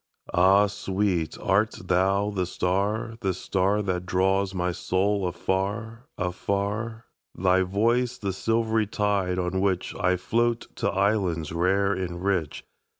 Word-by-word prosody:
Ah, 95 +3 +5
sweet, 95 -4 -1
art 100 +3 +2
thou 95 +3 +2
the 95 -3 -1
star, 100 +6 -1
the 95 -3 0
starThat 95 0 0
draws 95 +1 +1
my 90 -1 -1
soul 95 +2 0
afar, 105 +7 -3
afar? 100 +5 -2 0.3
Thy 95 0 +3
voice 115 +6 +1
the 100 -5 -3
silvery 110 +1 +1
tide 100 -3 0
on 90 +1 -1
whichI 90 -1 0
float 120 +3 0
to - - 0
islands 95 -6 0
rare 95 +4 +2
and 90 -2 -4
rich? 95 -6 -1
95 Hz, 120 wpm, -26 LUFS, 90-105 Hz, 0.3 s, Ah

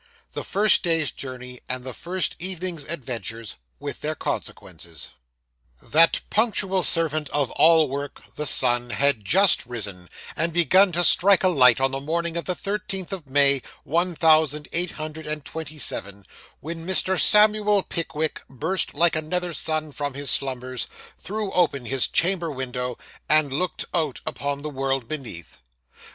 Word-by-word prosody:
THE - - -4
FIRST 205 0 +3
DAY'S 165 -6 +1
JOURNEY, 125 -1 -8
AND 130 0 -2
THE 130 -1 -6
FIRST 180 +7 -1
EVENING'S 180 -3 -3
ADVENTURES; 115 - -5 0.2
WITH - - -6
THEIR - - -2
CONSEQUENCES 85 -3 -6 0.7
That 165 +2 +3
punctual 205 -4 +1
servant 155 -4 0
of 145 -4 -1
all 160 -1 +5
work, 140 +1 -6
the 150 - -1
sun, 120 -2 +4
had 140 -3 +1
just 195 - +4
risen, 100 -7 -7 0.3
and 165 +1 0
begun 185 +3 +5
to 175 +1 +1
strike 190 +3 +5
a 185 - +5
light 130 -7 +5
on 135 0 +2
the 135 - -3
morning 165 +4 -2
of 170 - -3
the 180 - -1
thirteenth 195 -2 -4
of 175 -7 -7
May, 140 0 +4 0.2
one 170 +4 0
thousand 155 -2 +3
eight 175 0 0
hundred 155 0 -7
and 150 -1 -4
twenty 155 -1 -7
seven, 100 -7 -4 0.4
when 165 +2 -6
Mr. 190 +1 +2
Samuel 210 -1 +4
Pickwick 160 -2 -3
burst 160 +9 -1
like 170 +1 +3
another 175 +3 -2
sun 155 -1 -2
from 145 -1 -4
his 140 -1 -2
slumbers, 130 -2 -2 0.3
threw 210 0 -4
open 150 -9 +1
his 135 +1 +1
chamber 170 -1 +1
window, 125 -2 -4 0.3
and 150 -3 +4
looked 180 +6 -2
out 155 -6 -1
upon 140 0 -3
the 150 - -3
world 135 -2 -2
beneath. 115 - -7
155 Hz, 155 wpm, -24 LUFS, 135-175 Hz, 0.7 s, all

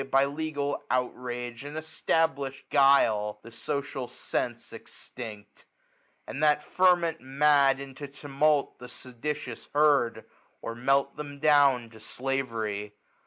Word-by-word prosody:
By 135 +1 +4
legal 145 -1 -3
outrage 125 -1 -3
and 145 +2 -7
e&tablish'd 155 -3 -1
guile, 110 -7 +4
The 115 - -12
social 140 0 -4
sense - - -4
extinct; 105 -4 -10 0.6
a^d 145 - -5
that 150 -1 +3
ferment 175 -3 +2
Mad 140 0 +3
into 140 +1 -8
tumult 145 +1 0
the 125 0 -10
seditious 125 0 -6
herd^ 135 -7 +3 0.3
Or 115 - -5
melt 135 +3 +2
{hem 145 -1 -6
down 140 -5 +4
to 110 - -14
slavery. 110 -5 -3
135 Hz, 115 wpm, -28 LUFS, 120-145 Hz, 0.6 s, By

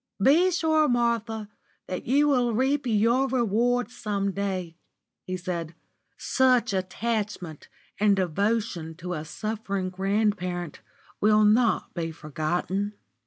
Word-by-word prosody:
"Be 310 - +5
sure, 315 -3 +2
Martha, 230 -3 0 0.4
that 185 - -5
you 285 +4 +4
will 245 -5 +2
reap 265 +3 +1
your 235 +4 +3
reward 245 -1 +1
some 200 -4 -2
day," 185 -4 -3 0.5
he 185 0 -2
said. 170 -3 -4 0.4
"Such 255 -5 +2
attachment 190 -3 -3 0.3
and 205 -1 +4
devotion 190 -2 -1
to 180 +2 -5
a 155 -3 -4
suffering 200 +1 -3
grandparent 190 -3 -1 0.4
will 215 +1 +4
not 220 +2 +3
be 165 -2 -3
forgotten." 175 +6 -2
210 Hz, 115 wpm, -26 LUFS, 185-235 Hz, 0.5 s, Be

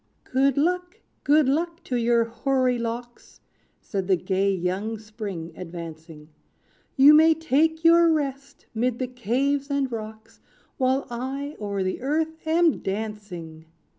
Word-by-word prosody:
"Good 270 +1 +1
luck! 360 +6 0 0.2
good 295 -1 +4
luck, 335 +5 -1
to 255 - -3
your 235 0 +3
hoary 255 +1 0
locks!" 235 +1 -6 0.4
Said 195 -3 -4
the 190 - +4
gay 190 +2 0
young 190 +4 -2
Spring, 205 -6 -7
advancing; 165 -3 -9 0.7
"You 280 +3 +8
may 320 +1 +6
take 320 +1 +1
your 335 0 +6
rest 280 -2 -3
'mid 240 +1 0
the 255 - -2
caves 255 +4 -1
and 280 -2 0
rocks, 220 -1 -8 0.4
While 260 0 +1
I 270 +4 -4
o'er 200 -2 -2
the 185 +4 -3
earth 320 +4 -2
am 330 0 +3
dancing. 190 -6 -6
250 Hz, 135 wpm, -25 LUFS, 205-285 Hz, 0.7 s, You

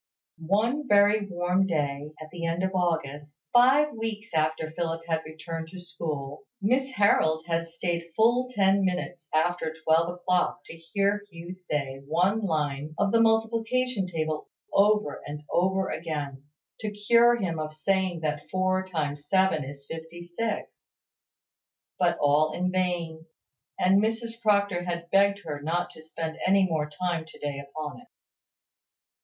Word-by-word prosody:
One 235 - +1
very 205 -1 +4
warm 180 +1 +1
day, 145 -3 -2
at 155 0 -10
the 175 -1 -7
end 165 +2 -1
of 190 0 0
August, 150 -5 -2 0.2
five 270 +5 +5
weeks 220 -2 -5
after 155 0 0
Philip 165 0 -3
had 160 -1 0
returned 160 +1 -6
to 185 +3 -10
school, 150 -3 -5
Miss 255 +6 +1
Harold 160 -7 +3
had 165 0 -1
stayed 170 0 -3
full 240 +3 +3
ten 195 -4 +3
minutes 180 -3 -2
after 160 0 0
twelve 165 +2 +3
o'clock 180 0 0
to - - -10
hear 200 +5 0
Hugh 170 0 -8
say 145 -7 -4
one 180 +7 +2
line 150 -3 -1
of 200 - +2
the 230 - +4
multiplication 225 0 +1
table 155 -3 -3 0.3
over 210 -5 +3
and 150 +1 -6
over 190 +2 +2
again, 145 -3 -4 0.3
to 215 - -2
cure 235 +4 +4
him 180 -8 -2
of 155 0 -4
saying 185 +1 0
that 150 -1 -3
four 185 0 +1
times 145 -4 -3
seven 190 -5 +3
is 140 +1 -9
fifty 165 +2 -8
six; 205 +5 -4 1.2
but 170 -2 +3
all 150 +2 +3
in 180 +1 -1
vain: 170 -3 -2 0.5
and 190 +2 +5
Mrs 225 +1 -2
Proctor 200 -4 +2
had 170 -1 -4
pegged 200 +1 +4
her 145 -2 -5
not 170 +4 -1
to - - -13
spend 160 0 -5
any 195 +1 +4
more 155 -4 -1
time 170 +2 -2
to 160 - -14
day 145 -1 -4
upon 150 +5 -7
it. 245 - -20
175 Hz, 150 wpm, -27 LUFS, 155-200 Hz, 1.2 s, five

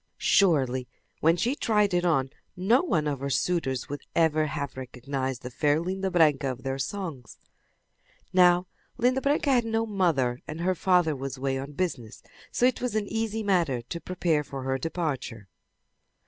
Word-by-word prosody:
Surely, 130 -9 +3 0.3
when 165 +2 +3
she 240 +8 +1
tried 210 -8 +1
it 175 0 +2
on 135 -7 +1 0.3
no 220 +8 +3
one 165 - 0
of 140 -3 -2
her 140 +1 -3
suitors 140 -4 0
would 145 0 -5
ever 155 -2 +3
have 140 -1 -4
recognized 130 0 -4
the 125 - -6
fair 145 +4 +2
Linda 190 +3 -2
Branca 155 -6 +3
of 125 -1 -9
their 135 0 -3
songs. 155 - -5 1.0
Now 180 -1 +5 0.3
Linda 255 +2 +2
Branca 285 +1 +1
had 245 -2 +4
no 225 0 0
mother, 165 - +1
and 155 +2 -5
her 185 +2 +2
father 180 -3 +2
was 135 0 -5
away 135 0 -1
on 140 +2 -7
business, 140 - -4 0.3
so 245 - +2
it 255 - +2
was 250 -3 -2
an 215 -1 0
easy 225 0 -2
matter 170 - +1
to 170 +8 -6
prepare 170 -4 0
for 135 -1 -7
her 135 0 -1
departure. 135 - -3
160 Hz, 170 wpm, -27 LUFS, 135-190 Hz, 1.0 s, Now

